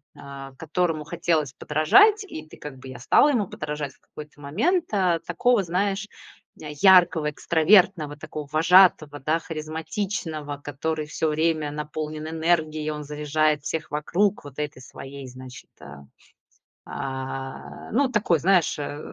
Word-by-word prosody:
э, 140 Hz, -1 st, -10 dB
которому 160 Hz, 0 st, -1 dB
хотелось 165 Hz, -4 st, -1 dB
подражать. 405 Hz, -, +4 dB
И 155 Hz, -, -8 dB
ты -, -, -14 dB
как 140 Hz, -3 st, -9 dB
бы, 130 Hz, -, -11 dB
я 130 Hz, -, -8 dB
стала 205 Hz, -, +4 dB
ему 230 Hz, -9 st, +1 dB
подражать 150 Hz, -4 st, -5 dB
в -, -, -30 dB
какой-то 150 Hz, -1 st, -13 dB
момент. 285 Hz, -, 0 dB
А, 180 Hz, -4 st, +2 dB
такого, 205 Hz, +7 st, +1 dB
знаешь, 195 Hz, +3 st, -1 dB, 0.5 s
э, 150 Hz, -1 st, -7 dB
яркого, 180 Hz, -5 st, +6 dB
экстравертного, 160 Hz, -2 st, +3 dB
такого 150 Hz, 0 st, -7 dB
вожатого, 160 Hz, -2 st, +5 dB
да, 155 Hz, +4 st, +1 dB
харизматичного, 160 Hz, -1 st, -4 dB
который 155 Hz, +2 st, -3 dB
всё 155 Hz, +1 st, -1 dB
время 155 Hz, -1 st, 0 dB
наполнен 150 Hz, +1 st, -5 dB
энергией. 160 Hz, -1 st, 0 dB
Он 150 Hz, 0 st, -5 dB
заряжает 150 Hz, 0 st, 0 dB
всех 160 Hz, +1 st, -4 dB
вокруг 180 Hz, +7 st, 0 dB
вот 140 Hz, -2 st, -11 dB
этой 145 Hz, -3 st, -4 dB
своей, 135 Hz, +1 st, -10 dB
значит, 125 Hz, -1 st, -11 dB
а, 70 Hz, -1 st, -12 dB, 0.8 s
а, 135 Hz, 0 st, -6 dB
ну, 260 Hz, +3 st, +2 dB
такой, 200 Hz, -6 st, +2 dB
знаешь, 180 Hz, -2 st, +2 dB
а, 145 Hz, 0 st, -5 dB
155 Hz, 140 wpm, -24 LUFS, 145-175 Hz, 0.8 s, яркого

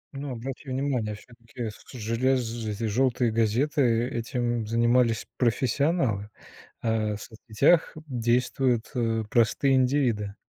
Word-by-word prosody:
Ну, 140 Hz, 0 st, -5 dB
обрати 130 Hz, +3 st, -7 dB
внимание, 130 Hz, -5 st, -1 dB
всё-таки, 115 Hz, +1 st, -8 dB
к -, -, -7 dB, 0.2 s
со 130 Hz, -, -9 dB
желез 115 Hz, 0 st, -1 dB
эти 105 Hz, +1 st, -4 dB
жёлтые 120 Hz, +2 st, +1 dB
газеты, 115 Hz, +7 st, +1 dB, 0.3 s
этим 120 Hz, -1 st, -2 dB
занимались 115 Hz, 0 st, +2 dB
профессионалы. 125 Hz, -, +1 dB, 0.5 s
А 110 Hz, -2 st, 0 dB
в -, -, -11 dB
соцсетях 120 Hz, +8 st, +1 dB
действуют, 125 Hz, -1 st, 0 dB
э, 115 Hz, -2 st, 0 dB
простые 130 Hz, +3 st, +3 dB
индивиды. 125 Hz, -6 st, +1 dB
120 Hz, 115 wpm, -26 LUFS, 110-130 Hz, 0.5 s, простые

